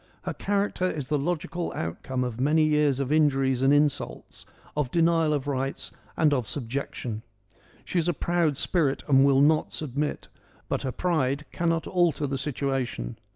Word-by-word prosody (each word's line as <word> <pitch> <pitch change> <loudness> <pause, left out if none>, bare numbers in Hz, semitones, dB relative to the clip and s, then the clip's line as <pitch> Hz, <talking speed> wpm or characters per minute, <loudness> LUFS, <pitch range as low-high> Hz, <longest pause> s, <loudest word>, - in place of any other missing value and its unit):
Her - - -3
character 200 -2 0
is 145 -6 -4
the 150 - +1
logical 170 +2 -2
outcome 125 +10 -3
of 125 -1 -4
many 155 +3 +4
years 150 -3 +2
of 140 0 -2
injuries 135 -4 +3
and 135 +1 +4
insults: 145 -1 0 0.3
of 150 -4 0
denial 165 0 +3
of 145 -2 -1
rights 135 -1 -2 0.3
and 150 -2 +4
of 125 -6 -1
subjection. 125 -4 -4 0.6
She 180 - 0
is 165 - 0
a - - +4
proud 170 -4 +1
spirit 150 -4 0
and 135 -2 +5
will 140 -1 +5
not 155 +2 +3
submit, 150 0 -3 0.4
but - - -1
her 130 - -2
pride 150 -4 0
cannot 165 -1 0
alter 170 -5 +1
the 135 -1 -2
situation. 135 - -2
145 Hz, 160 wpm, -26 LUFS, 135-160 Hz, 0.6 s, and